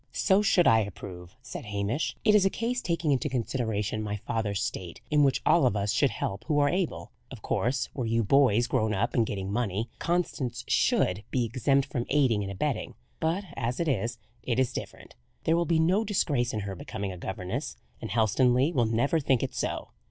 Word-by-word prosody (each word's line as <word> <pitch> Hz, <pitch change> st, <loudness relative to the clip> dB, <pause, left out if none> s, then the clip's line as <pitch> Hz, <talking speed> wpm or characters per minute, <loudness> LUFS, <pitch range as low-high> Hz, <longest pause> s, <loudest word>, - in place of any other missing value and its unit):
"So 195 Hz, 0 st, +3 dB
should 190 Hz, -4 st, +4 dB
I 110 Hz, -, +6 dB
approve," 90 Hz, -3 st, -7 dB
said 125 Hz, -, -7 dB
Hamish. 105 Hz, +7 st, -2 dB
"It 210 Hz, -, +5 dB
is 210 Hz, -2 st, +6 dB
a 195 Hz, -, +4 dB
case, 240 Hz, +4 st, -2 dB
taking 170 Hz, -3 st, 0 dB
into 140 Hz, +2 st, +1 dB
consideration 110 Hz, -4 st, -2 dB
my 105 Hz, -1 st, -3 dB
father's 105 Hz, -1 st, -2 dB
state, 85 Hz, -2 st, -5 dB
in 150 Hz, 0 st, +4 dB
which 135 Hz, -1 st, +2 dB
all 160 Hz, -4 st, +5 dB
of 110 Hz, -, 0 dB
us 100 Hz, 0 st, 0 dB
should -, -, +3 dB
help 100 Hz, +3 st, -4 dB
who 150 Hz, -2 st, 0 dB
are 145 Hz, -1 st, +4 dB
able. 180 Hz, 0 st, -2 dB, 0.2 s
Of -, -, -11 dB
course, 125 Hz, +2 st, 0 dB
were 125 Hz, -4 st, -3 dB
you 115 Hz, +1 st, +1 dB
boys 120 Hz, 0 st, +4 dB
grown 110 Hz, -4 st, 0 dB
up 110 Hz, +5 st, 0 dB
and 115 Hz, -3 st, +2 dB
getting 95 Hz, -1 st, -4 dB
money, 110 Hz, 0 st, -1 dB
Constance 165 Hz, -8 st, -1 dB
should 90 Hz, +3 st, +2 dB
be 125 Hz, -2 st, 0 dB
exempt 135 Hz, +3 st, +1 dB
from 120 Hz, -1 st, -3 dB
aiding 130 Hz, -7 st, +3 dB
and 100 Hz, -1 st, -4 dB
abetting; 120 Hz, +4 st, -2 dB, 0.2 s
but 165 Hz, +5 st, 0 dB
as 120 Hz, 0 st, -2 dB
it 170 Hz, -, 0 dB
is, 120 Hz, -3 st, -1 dB, 0.2 s
it 120 Hz, -2 st, -1 dB
is 130 Hz, -1 st, +1 dB
different. -, -, -7 dB, 0.3 s
There 165 Hz, -, +3 dB
will 170 Hz, 0 st, +1 dB
be 165 Hz, 0 st, +2 dB
no 180 Hz, +7 st, +3 dB
disgrace 145 Hz, -, 0 dB
in 110 Hz, -, -3 dB
her 100 Hz, -1 st, -4 dB
becoming 95 Hz, +3 st, -5 dB
a 90 Hz, -, -8 dB
governess; 95 Hz, 0 st, -4 dB, 0.2 s
and -, -, -5 dB
Helstonleigh 125 Hz, -, +3 dB
will 120 Hz, -6 st, +2 dB
never 120 Hz, +8 st, +1 dB
think 135 Hz, -4 st, +1 dB
it -, -, -3 dB
so. -, -, -3 dB
120 Hz, 205 wpm, -28 LUFS, 105-150 Hz, 0.3 s, I